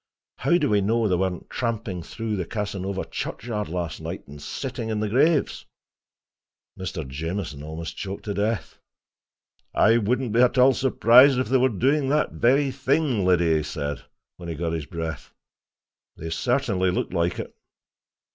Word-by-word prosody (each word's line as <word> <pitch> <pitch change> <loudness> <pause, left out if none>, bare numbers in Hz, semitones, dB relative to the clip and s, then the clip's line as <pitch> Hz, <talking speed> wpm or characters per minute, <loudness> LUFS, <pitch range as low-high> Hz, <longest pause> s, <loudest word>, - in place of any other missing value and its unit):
How 175 - +3
do 150 - +1
we 105 -4 +3
know 110 +3 +1
they 90 - +2
weren't 90 -1 -2
tramping 115 -6 -3
through 110 +5 -4
the 90 -3 -2
Casanova 100 -2 -3
churchyard 105 -3 -4
last 85 -3 -4
night, - - -6
and 70 +1 -11
sitting 125 - -5
on 110 -1 -1
the 105 - 0
graves!" 145 +7 +2 1.1
Mr. 90 -5 -5
Jamieson 80 +2 -4
almost 80 +1 -6
choked 100 0 -6
to 105 - -2
death. 105 -3 -2 1.0
"I 115 +2 +5
wouldn't 120 +1 0
be 120 - +4
at 125 +1 +3
all 130 +1 +6
surprised 130 +1 +6
if 130 - -1
they 130 - +4
were 130 +1 +3
doing 135 +6 +1
that 150 +2 +1
very 135 +3 +2
thing, 135 -4 +1
Liddy," 85 -3 +3
he - - 0
said, 75 -2 -4 0.3
when 85 -1 -8
he 80 - -3
got 85 +1 -2
his 80 -4 -4
breath. 80 -3 -6 0.8
"They 80 +1 -6
certainly 105 -3 +1
look 90 - -2
like 85 0 0
it." - - -7
105 Hz, 165 wpm, -24 LUFS, 85-125 Hz, 1.1 s, all